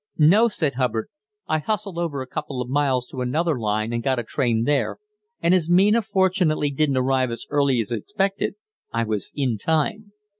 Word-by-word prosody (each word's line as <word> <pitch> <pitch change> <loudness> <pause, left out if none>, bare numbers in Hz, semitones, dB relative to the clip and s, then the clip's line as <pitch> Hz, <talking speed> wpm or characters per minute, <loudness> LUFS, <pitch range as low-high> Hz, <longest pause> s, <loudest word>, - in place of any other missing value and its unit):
"No," 190 +10 +6
said 160 -10 -1
Hubbard; 120 -3 -1 0.4
"I 155 - +1
hustled 205 0 -3
over 150 -6 -2
a - - -9
couple 135 0 -5
of 125 - -3
miles 130 -2 +1
to 130 - -6
another 150 +3 0
line 110 +1 -1
and 115 - -1
got 130 +2 0
a 120 - -1
train 115 -1 0
there, 145 +2 0 0.4
and 170 - +3
as 175 -3 +2
Mina 200 +6 +5
fortunately 185 -7 +1
didn't 140 -1 +1
arrive 130 0 +2
as 115 - -6
early 140 -4 +2
as 110 -1 -2
expected, 195 - -1 0.4
I 115 - 0
was 110 -3 -3
in 125 -7 -1
time." 165 - -1
140 Hz, 185 wpm, -23 LUFS, 125-175 Hz, 0.4 s, No